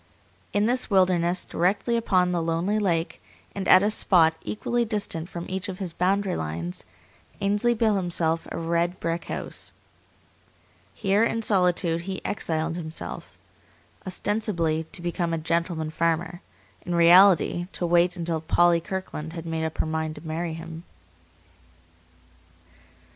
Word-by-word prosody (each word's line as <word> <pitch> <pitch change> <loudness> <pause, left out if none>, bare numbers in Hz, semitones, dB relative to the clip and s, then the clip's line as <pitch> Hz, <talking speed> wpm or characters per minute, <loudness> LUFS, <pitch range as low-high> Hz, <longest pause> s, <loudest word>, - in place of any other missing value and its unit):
In 205 +1 +2
this 250 +2 +1
wilderness, 185 -2 +2
directly 200 +7 0
upon 185 -6 +2
the 175 -1 0
lonely 165 +6 0
lake, 170 -5 -1 0.3
and 195 -1 -4
at 185 - +7
a 210 - +2
spot 165 -6 +4
equally 240 +3 -1
distant 205 -7 -3
from 170 -2 -6
each 190 +1 -4
of 185 - -5
his 185 -4 -4
boundary 190 +2 +1
lines, 85 +3 -4 0.6
Ainsley 205 +4 +1
built 220 -2 +2
himself 170 -3 0
a - - -4
red 170 +2 -1
brick 165 +1 -2
house. - - -6 1.2
Here, 200 +1 +2
in 230 0 0
solitude, 180 -4 +2
he 190 +2 -5
exiled 160 -3 -2
himself; 160 -2 -6 0.7
ostensibly 185 -5 -1
to 175 +2 -6
become 175 -1 -1
a - - 0
gentleman 160 0 -1
farmer; 170 +2 -1 0.4
in 175 -1 -2
reality 175 0 +5
to 175 - -2
wait 175 +1 +3
until 165 -2 -2
Polly 170 +1 +3
Kirkland 165 -4 -5
had 165 -1 -7
made 160 -1 -2
up 160 - -5
her - - 0
mind 160 0 -2
to 150 - -10
marry 165 +1 -3
him. 165 0 -8
175 Hz, 140 wpm, -25 LUFS, 165-195 Hz, 1.2 s, at